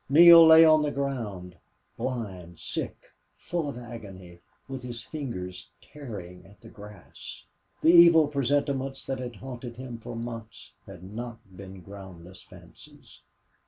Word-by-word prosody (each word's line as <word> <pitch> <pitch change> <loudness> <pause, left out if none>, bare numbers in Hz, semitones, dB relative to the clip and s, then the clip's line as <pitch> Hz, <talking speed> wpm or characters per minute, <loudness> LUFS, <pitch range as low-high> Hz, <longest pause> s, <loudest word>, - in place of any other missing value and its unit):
Neale 170 +3 +9
lay 160 0 +9
on 155 -1 +5
the 150 - 0
ground, 110 -11 -5 0.4
blind, 95 -9 -6
sick, - - -6 0.3
full 170 -4 -3
of 135 - -7
agony, 100 -7 -11 0.3
with 135 -1 -7
his 120 -2 -7
fingers 115 - -7
tearing 100 -12 -10
at 100 +1 -19
the - - -13
grass. 105 -2 -12 0.4
The 160 - +6
evil 170 -3 +7
presentiments 140 -1 -1
that 135 -1 -4
had 120 -2 -6
haunted 120 +1 -9
him 125 -2 -8
for 115 - -8
months 115 - -8
had 90 -2 -12
not 115 +5 -7 0.2
been 95 0 -11
groundless 95 -2 -12
fancies. - - -17
120 Hz, 135 wpm, -27 LUFS, 95-140 Hz, 0.4 s, Neale